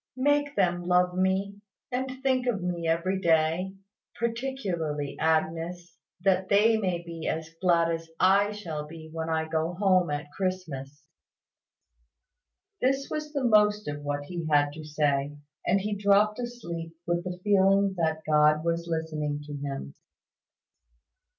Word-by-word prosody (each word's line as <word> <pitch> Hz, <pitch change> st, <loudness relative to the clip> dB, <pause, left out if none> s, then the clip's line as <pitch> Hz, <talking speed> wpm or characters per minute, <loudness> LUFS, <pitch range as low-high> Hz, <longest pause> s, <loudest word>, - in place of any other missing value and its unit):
Make 290 Hz, +2 st, +2 dB
them 175 Hz, -2 st, +1 dB
love 180 Hz, 0 st, +3 dB
me, 190 Hz, +2 st, 0 dB, 0.3 s
and 260 Hz, +1 st, -3 dB
think 260 Hz, -2 st, +1 dB
of 205 Hz, -7 st, 0 dB
me 175 Hz, -2 st, -2 dB
every 170 Hz, +4 st, +1 dB
day, 165 Hz, +3 st, +2 dB, 0.4 s
particularly 200 Hz, -, -2 dB
Agnes, 165 Hz, +2 st, -1 dB, 0.3 s
that 190 Hz, 0 st, +2 dB
they 210 Hz, +3 st, +5 dB
may 185 Hz, -5 st, -1 dB
be 165 Hz, -1 st, -6 dB
as 160 Hz, 0 st, -3 dB
glad 170 Hz, -2 st, +3 dB
as 165 Hz, 0 st, -4 dB
I 200 Hz, +2 st, +4 dB
shall 160 Hz, -8 st, -5 dB
be 160 Hz, 0 st, -11 dB
when 165 Hz, 0 st, -3 dB
I 160 Hz, 0 st, 0 dB
go 160 Hz, +2 st, -1 dB
home 185 Hz, -3 st, +3 dB
at 145 Hz, 0 st, -4 dB
Christmas." 155 Hz, -7 st, -4 dB, 1.8 s
This 270 Hz, +2 st, +1 dB
was 305 Hz, -1 st, -3 dB
the 280 Hz, -3 st, -2 dB
most 210 Hz, -2 st, +4 dB
of 145 Hz, 0 st, -4 dB
what 145 Hz, 0 st, -3 dB
he 170 Hz, +1 st, -5 dB
had 145 Hz, -1 st, +3 dB
to 155 Hz, +1 st, -8 dB
say; 145 Hz, -1 st, 0 dB, 0.3 s
and 195 Hz, +3 st, +4 dB
he 210 Hz, +2 st, -2 dB
dropped 205 Hz, +2 st, +3 dB
asleep 170 Hz, -10 st, -6 dB
with 175 Hz, 0 st, 0 dB
the 180 Hz, -1 st, -5 dB
feeling 195 Hz, -1 st, +4 dB
that 160 Hz, -1 st, 0 dB
God 150 Hz, +1 st, +4 dB
was 170 Hz, 0 st, -1 dB
listening 155 Hz, -3 st, -2 dB
to 145 Hz, 0 st, -8 dB
him. 140 Hz, -, -5 dB
175 Hz, 145 wpm, -28 LUFS, 160-200 Hz, 1.8 s, they